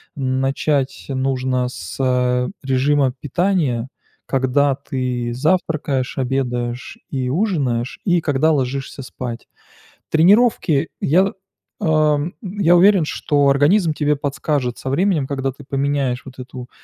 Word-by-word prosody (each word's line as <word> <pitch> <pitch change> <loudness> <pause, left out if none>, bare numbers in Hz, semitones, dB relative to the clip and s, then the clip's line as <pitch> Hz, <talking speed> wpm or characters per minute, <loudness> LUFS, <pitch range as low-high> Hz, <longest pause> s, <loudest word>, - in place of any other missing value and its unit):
начать 135 +1 -1
нужно 130 -1 0
с, 90 -8 -8
а, 125 -1 +1 0.2
режима 135 0 +2
питания. 150 -6 0 0.4
Когда 135 +1 +2
ты 125 -3 -3
завтракаешь, 145 -3 0
обедаешь 125 -2 -2
и 130 -2 -2
ужинаешь, 135 - -1
и 175 -3 +3
когда 155 +1 +2
ложишься 135 -1 -2
спать. 125 -2 -7 0.6
Тренировки, 180 - +4
я, 185 +6 +3 0.5
ам, 155 0 +2
я 185 -3 +2
уверен, 185 -1 +5
что 145 -1 +1
организм 155 +5 +3
тебе 150 -1 +1
подскажет 140 -3 -2
со 130 - -5
временем, 170 -1 +1
когда 135 -1 -2
ты 140 +3 -14
поменяешь 135 -2 -1
вот 135 -1 -12
эту 125 -1 -9
135 Hz, 115 wpm, -20 LUFS, 130-155 Hz, 0.6 s, уверен